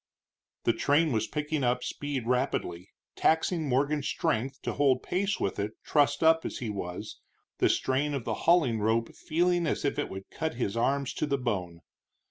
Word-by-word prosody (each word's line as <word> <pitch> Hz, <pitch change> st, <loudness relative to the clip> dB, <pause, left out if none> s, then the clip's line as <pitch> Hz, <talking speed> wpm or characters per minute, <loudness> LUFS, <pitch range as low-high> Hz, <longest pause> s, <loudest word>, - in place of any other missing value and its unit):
The -, -, +3 dB
train 150 Hz, +2 st, +2 dB
was 110 Hz, -2 st, 0 dB
picking 150 Hz, -1 st, -2 dB
up 125 Hz, 0 st, +1 dB
speed 145 Hz, -4 st, -3 dB
rapidly, 120 Hz, -8 st, -1 dB, 0.3 s
taxing 160 Hz, -1 st, +1 dB
Morgan's 140 Hz, +3 st, +1 dB
strength 130 Hz, +5 st, -1 dB
to -, -, -2 dB
hold 135 Hz, -3 st, +2 dB
pace 195 Hz, +2 st, -1 dB
with 95 Hz, -, -2 dB
it 105 Hz, +2 st, -2 dB
trussed 145 Hz, +1 st, +2 dB
up 160 Hz, 0 st, +5 dB
as -, -, -4 dB
he 115 Hz, -4 st, -3 dB
was, 90 Hz, -3 st, -6 dB, 0.4 s
the -, -, +4 dB
strain 140 Hz, +3 st, +1 dB
of 135 Hz, -, -3 dB
the 115 Hz, -, -1 dB, 0.2 s
hauling 145 Hz, -11 st, +4 dB
rope 115 Hz, +2 st, +1 dB
feeling 175 Hz, +1 st, +1 dB
as -, -, -1 dB
if 140 Hz, -, 0 dB
it -, -, -2 dB
would 95 Hz, 0 st, -8 dB
cut 160 Hz, -5 st, -3 dB
his 120 Hz, -4 st, -2 dB
arms 135 Hz, +3 st, 0 dB
to 155 Hz, -, -2 dB
the 140 Hz, -1 st, +1 dB
bone. 90 Hz, -9 st, -3 dB
135 Hz, 180 wpm, -29 LUFS, 115-150 Hz, 0.4 s, up